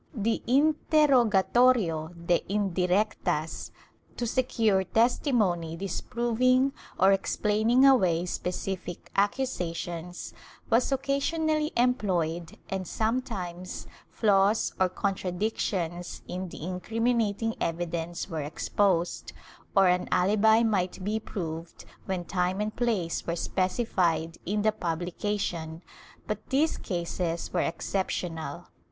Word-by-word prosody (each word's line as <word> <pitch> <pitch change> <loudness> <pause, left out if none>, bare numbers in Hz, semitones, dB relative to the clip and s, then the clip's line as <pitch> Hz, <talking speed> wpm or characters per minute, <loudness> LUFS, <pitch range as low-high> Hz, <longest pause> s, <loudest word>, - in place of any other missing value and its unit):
The 225 0 0
interrogatorio 245 - +3
de 175 0 +2
indirectas, 185 -4 0 0.5
to 240 - -1
secure 225 -5 +2
testimony 210 - +1
disproving 240 +7 +1 0.3
or 190 +1 +6
explaining 215 +5 +3
away 185 -11 +4
specific 180 0 -4
accu 205 +7 +2
sations, 175 -5 -5 0.4
was 240 +4 +3
occasionally 300 +3 0
employed, 175 -9 0
and 190 -2 -3
sometimes 205 -7 -3 0.2
flaws 205 0 +2
or 185 -1 +3
con 195 +2 -1
tradictions 180 -2 -3
in 185 0 -4
the 155 - -9
incriminating 225 +4 0
evidence 170 0 -2
were 160 -4 -3
exposed, 175 +4 0 0.4
or 195 -1 +6
an 180 0 +1
alibi 215 +4 +4
might 190 -4 0
be 215 +3 0
proved 165 -5 -6 0.2
when 185 -2 -2
time 180 +1 0
and 215 +1 -2
place 215 -9 -1
were 170 - 0
specified 180 -3 0
in 205 +2 0
the 215 - +4
pubhcation, 175 -2 -3 0.4
but 215 0 -5
these 295 +4 +2
cases 170 -2 -3
were 180 - +2
exceptional. 170 -2 -3
195 Hz, 100 wpm, -28 LUFS, 175-225 Hz, 0.5 s, or